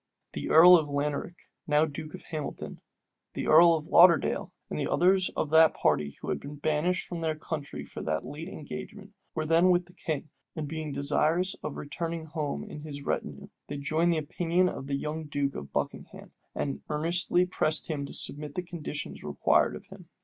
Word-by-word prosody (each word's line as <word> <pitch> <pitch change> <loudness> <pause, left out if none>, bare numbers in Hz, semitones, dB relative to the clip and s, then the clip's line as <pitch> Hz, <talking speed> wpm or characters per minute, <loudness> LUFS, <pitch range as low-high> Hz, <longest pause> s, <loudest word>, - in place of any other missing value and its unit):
The - - -4
earl 175 +3 +9
of 155 -3 -1
Laneric, 145 +4 -2 0.3
now 150 +1 +4
duke 155 +2 -7
of 185 - -12
Hamilton, 155 -3 -5 0.5
the - - -3
earl 165 +2 +7
of 155 -1 -4
Lauderdale, 170 -1 +5 0.2
and - - -4
others 185 +1 +3
of 155 - -1
that 160 0 +6
party 75 -1 0
who - - -6
had - - -1
been 145 +1 -8
banished 155 +6 -1
their 165 -2 -2
country 155 -2 -5
for - - -8
the 80 0 -1
late 155 +4 -7
engagement, 200 +5 -8 0.2
were 155 -1 -1
then 165 +3 +4
with 175 -1 +3
the 180 - -16
king; 155 -4 -4 0.2
and 155 -3 -4
being 155 0 -4
desirous 155 +6 +1
of 150 - -5
returning 165 +3 -4
home 155 -2 -3
in 150 - -9
his 145 -2 -7
retinue, - - -3 0.2
they 145 - -5
joined 155 +4 +1
the 165 - +1
opinion 170 +4 +1
of 135 - -7
the 140 - -1
young 155 +2 -4
duke 145 -2 -1
of 70 - -8
Buckingham, - - -5 0.2
and 140 - -3
earnestly 170 +3 +2
pressed 160 -3 +1
him 150 -3 -3
to - - -10
submit 145 0 -4
to 180 - -2
the - - -22
conditions 155 -4 -5
required - - +2
of - - -10
him. - - -13
155 Hz, 185 wpm, -28 LUFS, 145-170 Hz, 0.5 s, earl